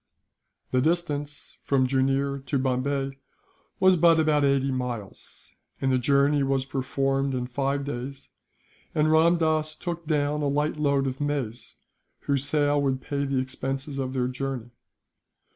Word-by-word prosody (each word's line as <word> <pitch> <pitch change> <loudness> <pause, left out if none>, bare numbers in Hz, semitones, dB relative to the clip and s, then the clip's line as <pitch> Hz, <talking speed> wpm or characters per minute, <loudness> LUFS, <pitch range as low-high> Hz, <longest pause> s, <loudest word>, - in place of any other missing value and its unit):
The 130 - +2
distance 150 -2 -2
from 135 -2 +2
Jooneer 135 +1 0
to 140 - +1
Bombay 135 +1 -1 0.6
was 185 -1 +5
but 165 0 +5
about 155 -2 +3
eighty 140 -1 +2
miles, 125 -6 -6 0.3
and 135 - +1
the 130 - +3
journey 140 +3 +3
was 135 -1 +1
performed 135 0 -1
in 125 -1 -2
five 140 +2 -1
days, 135 0 -6 0.6
and 155 0 +3
Ramdass 160 -1 +3
took 170 -2 -5
down 150 -1 +1
a 145 - +1
light 150 +2 0
load 140 -2 +1
of 135 +1 -3
maize, 140 -6 -3 0.5
whose 140 -1 0
sale 145 -1 +2
would 135 -2 0
pay 140 +1 -2
the 135 -1 -1
expenses 135 +2 -3
of 130 -1 -2
their 125 -2 0
journey. 130 -2 -4
140 Hz, 145 wpm, -26 LUFS, 130-145 Hz, 0.6 s, was